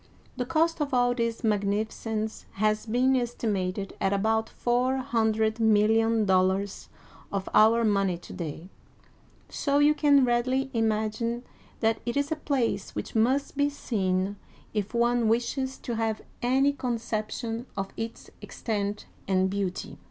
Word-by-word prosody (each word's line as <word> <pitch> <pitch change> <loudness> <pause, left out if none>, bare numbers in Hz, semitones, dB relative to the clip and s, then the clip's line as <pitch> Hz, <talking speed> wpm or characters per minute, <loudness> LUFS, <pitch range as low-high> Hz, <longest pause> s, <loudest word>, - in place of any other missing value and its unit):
The 250 -1 -3
cost 330 +2 +1
of 285 -3 0
all 245 0 +3
this 230 -1 -2
magnificence 215 +1 -1
has 215 +2 0
been 255 +4 +3
estimated 200 -6 -2
at 195 - +2
about 220 +2 +1
four 250 +2 +1
hundred 220 -4 +1
million 220 0 +3
dollars 190 +1 +1 0.4
of 195 -1 -2
our 230 +2 +6
money 195 -4 +2
to 175 - -11
day, 165 +1 -6 0.8
so 280 -1 0
you 295 +1 +5
can 285 -3 +4
readily 255 +3 +1
imagine 225 +1 0 0.4
that 225 -1 +2
it 240 +3 -2
is 285 +1 0
a - - +2
place 250 -10 -1
which - - -5
must 260 +7 +1
be 285 +1 +2
seen 195 -7 -1 0.4
if 210 +1 -2
one 235 0 +2
wishes 250 +4 0
to 235 -2 -4
have 225 -1 -1 0.2
any 270 +3 +3
conception 230 -1 -3
of 195 0 -2
its 225 0 -6
extent 210 -2 -3 0.2
and 190 -1 +2
beauty. 195 -2 -3
225 Hz, 135 wpm, -27 LUFS, 205-250 Hz, 0.8 s, our